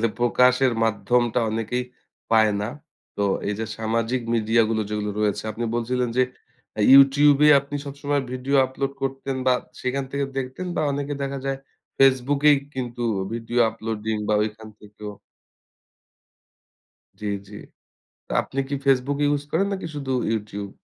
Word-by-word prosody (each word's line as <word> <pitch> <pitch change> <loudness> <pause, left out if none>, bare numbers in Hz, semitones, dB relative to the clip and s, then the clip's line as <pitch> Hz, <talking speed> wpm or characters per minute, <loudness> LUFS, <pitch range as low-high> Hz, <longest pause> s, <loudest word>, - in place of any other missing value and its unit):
আসলে 115 - +2
প্রকাশের 125 +2 +3
মাধ্যমটা 120 +2 +1
অনেকেই 115 +3 -2 0.5
পায় 110 -1 +4
না। 105 - -2 0.5
তো 100 - -1 0.3
এই 105 - -1
যে 110 - -2
সামাজিক 115 +3 -1
মিডিয়া 115 0 +3
গুলো 110 -1 0
যেগুলো 105 -1 -2
রয়েছে, 105 -2 0
আপনি 115 +2 -4
বলছিলেন 125 +1 -1
যে, 130 - +5 0.5
অ্যা 105 - -1
YouTube 140 +1 +7
এ - - +7
আপনি 140 +1 -6
সবসময় 140 0 -2
ভিডিও 130 +2 0
আপলোড 135 +1 -3
করতেন 135 0 -3
বা 130 - +5 0.3
সেখান 135 +2 -1
থেকে 140 0 -1
দেখতেন 130 +7 -4
বা - - +1
অনেকে 145 +1 -3
দেখা 140 0 -3
যায়, 135 0 -1 0.4
FaceBook 135 +1 +3
এই 145 - +6 0.2
কিন্তু 120 -2 -4 0.3
ভিডিও 115 +1 -3
আপলোডিং 110 -1 -3
বা 105 - +3
ঐখান 110 +1 -5
থেকেও 105 0 -9 2.1
জ্বী, 105 - -2 0.2
জ্বী। 105 +1 -10 0.7
তো - - -9
আপনি 135 - -5
কি 140 - -2
FaceBook 135 +1 +2 0.2
use 145 0 -5
করেন 195 +5 +1
নাকি 190 -3 -4
শুধু 135 -2 -4 0.2
YouTube? 105 -2 -4
125 Hz, 150 wpm, -23 LUFS, 110-135 Hz, 2.1 s, YouTube